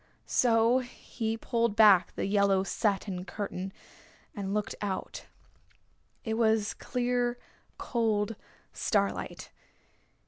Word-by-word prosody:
So 235 +1 +3
he 225 -2 -5
pulled 230 -2 0
back 200 -5 +6
the - - -2
yellow 200 -1 +3
satin 195 -2 -1
curtain, 190 -1 -5 0.6
and 195 -2 -4
looked 210 +1 -1
out. 200 -2 -4 1.0
It 220 -1 -2
was 220 -2 +2
clear, 245 0 -1 0.4
cold 220 -3 0 0.4
starlight. 200 -2 -1
215 Hz, 95 wpm, -29 LUFS, 200-230 Hz, 1.0 s, back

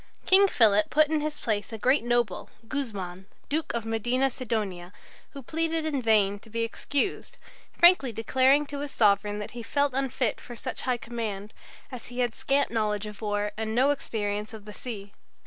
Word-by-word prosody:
King 390 +1 +7
Philip 210 - +4
put 305 0 +4
in 310 -1 +1
his 300 0 -3
place 210 -2 -2
a 225 - -5
great 255 +4 +2
noble, 240 -5 0 0.2
Guzman, 195 -9 -5 0.2
Duke 310 +2 -1
of 230 -1 -3
Medina 240 +4 0
Sidonia, 210 -8 -3 0.4
who 275 -2 -8
pleaded 325 +3 -1
in 290 -4 -1
vain 205 -3 +3
to 225 - -16
be 230 +1 -2
excused, 285 - -2 0.4
frankly 345 -8 +7
declaring 260 +6 +3
to 285 0 -6
his 290 0 -4
sovereign 205 -3 +2
that 210 - -6
he 240 - -7
felt 285 +3 0
unfit 260 -3 -1
for 240 - -9
such - - -5
high 250 - +2
command, 220 -4 -5 0.4
as 250 -3 -7
he 245 - -10
had 240 -2 0
scant 275 +1 0
knowledge 215 -2 -1
of 210 0 -9
war 205 -1 -1
and 220 0 -3
no 265 +4 +4
experience 210 -5 -3
of 210 -2 -12
the 210 - -9
sea. 205 -5 -7
230 Hz, 180 wpm, -27 LUFS, 210-275 Hz, 0.4 s, King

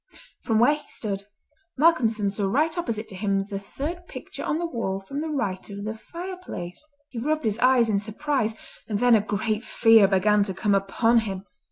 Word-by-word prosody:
From 225 -3 +1
where 240 +6 +5
he 300 - -8
stood, 200 -2 -3 0.5
Malcolmson 230 -10 +3
saw 200 0 -1
right 305 - +1
opposite 230 -11 -3
to 195 - -8
him 195 0 0
the 195 - -2
third 330 - -6
picture - - -8
on 300 - 0
the 345 - -2
wall 230 - -2
from 275 +9 -5
the 320 - -3
right 205 -12 -2
of 200 0 -7
the 220 +1 -3
fireplace. 340 - -7 0.3
He 240 - -6
rubbed 305 +3 -1
his 215 0 0
eyes 250 -2 +5
in 205 -2 +2
surprise, 225 +1 -1 0.3
and 210 - -1
then 245 +2 +4
a 220 - +6
great 215 +2 -2
fear 225 -5 +5
began 205 +2 +3
to 190 -2 -5
come 205 +2 +1
upon 225 +4 +3
him. 195 -3 -5
220 Hz, 195 wpm, -25 LUFS, 200-275 Hz, 0.5 s, a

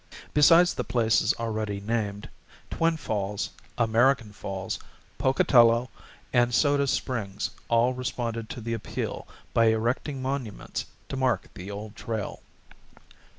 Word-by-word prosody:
Besides 165 +4 +6
the - - -2
places 115 -2 +2
already 110 -3 -2
named, 105 -1 -2 0.4
Twin 165 0 +1
Falls, 105 -6 -2 0.3
American 115 0 +3
Falls, 95 -2 -4 0.4
Pocatello, 120 -2 +4 0.4
and 120 -1 +3
Soda 140 +1 +3
Springs 110 -7 -2 0.2
all 115 +2 +3
responded 115 -3 -3
to 120 - -6
the 115 +1 -3
appeal 115 - -4 0.3
by 115 - +4
erecting 115 +5 +1
monuments 130 -5 -4 0.2
to 135 - -3
mark 125 -6 0
the 90 +2 -8
Old 105 +1 -7
Trail. 110 -4 -4
115 Hz, 115 wpm, -27 LUFS, 110-130 Hz, 0.4 s, Besides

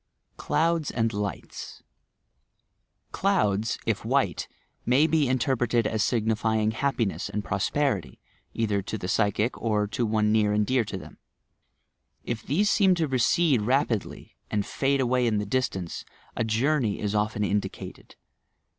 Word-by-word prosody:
CLOUDS 165 -1 0
AND 115 -1 0
LIGHTS 100 -2 -5 1.3
Clouds, 115 - +1
if - - -1
white, - - 0 0.4
may 130 +5 +4
be 160 -4 +2
interpreted 120 -2 +1
as 110 0 0
signifying 110 -1 +1
happiness 115 -5 -1
and 105 +1 -3
prosperity, 105 - -1 0.3
either 105 -3 0
to 110 - -5
the 90 - -6
payehio, 105 +4 +1
or 105 -2 +1
to 110 +4 -2
one 105 0 +2
near 105 -1 +3
and 105 0 +2
dear 130 +1 +2
to 105 -2 -5
them. - - -12 1.0
If 120 -2 -3
these 185 - +1
seem 190 -4 +4
to 165 -3 0
recede 135 +1 +2
rapidly, 125 -1 -1
and 105 -2 -1
fade 140 0 0
away 125 -1 +2
in 110 -2 +1
the 105 - -1
distance, 100 -7 -2 0.3
a - - 0
journey 115 +1 +1
is 105 -1 -2
often 105 0 0
indicated. 105 0 -4
115 Hz, 135 wpm, -26 LUFS, 105-130 Hz, 1.3 s, may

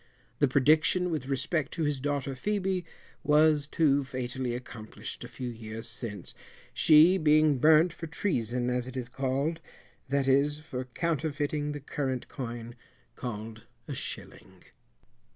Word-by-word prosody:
The 145 - +4
prediction 155 +7 +3
with 150 -5 -3
respect 140 +3 -1
to 165 - -2
his 145 -2 0
daughter 140 0 -2
Phœbe 190 +4 -1 0.4
was 150 -1 +5
too 145 -3 +2
fatally 130 -1 -3
accomplished 115 -3 -8
a - - -7
few 125 -1 -6
years 115 0 -7
since, 115 -5 -2 0.4
she 165 +4 +6
being 155 -2 +4
burnt 155 +4 +5
for 165 -1 -7
treason 125 - -1
as 125 0 -1
it 130 0 -7
is 125 -2 -3
called, 135 +5 -1 0.5
that 140 0 +1
is, 140 +2 +3
for 135 -5 -6
counterfeiting 150 0 -2
the 145 - -5
current 135 -2 -3
coin 120 -2 -6 0.4
called 110 -1 -7 0.2
a - - -4
shilling. - - -7
140 Hz, 135 wpm, -29 LUFS, 125-155 Hz, 0.5 s, she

